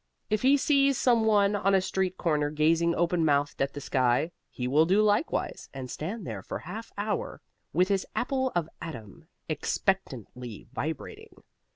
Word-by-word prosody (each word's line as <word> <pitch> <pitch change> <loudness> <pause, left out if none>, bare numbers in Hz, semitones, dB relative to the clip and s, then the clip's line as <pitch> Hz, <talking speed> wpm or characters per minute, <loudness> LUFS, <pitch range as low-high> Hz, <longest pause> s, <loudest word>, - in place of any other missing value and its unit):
If 215 -1 +2
he 275 +2 +5
sees 275 -1 +3
some 235 -3 +3
one 205 -2 +4
on 195 0 +2
a - - +5
street 185 0 -1
corner 150 -4 +1
gazing 165 +3 +2
open 175 0 +1
mouthed 145 -2 +1
at 135 0 +1
the - - -4
sky, 130 +3 +1 0.2
he 125 - -4
will 150 +5 +4
do 195 +4 +4
likewise, 215 - 0
and 130 -2 -6
stand 190 +6 -5
there 110 -4 -5
for - - -5
half 215 +8 -8
hour 205 0 -2 0.3
with 180 +4 +2
his 195 -2 0
apple 260 0 0
of 170 -3 +1
Adam 155 +2 -9 0.2
expectantly 130 - -2
vibrating. 425 - -6
175 Hz, 165 wpm, -28 LUFS, 145-210 Hz, 0.3 s, he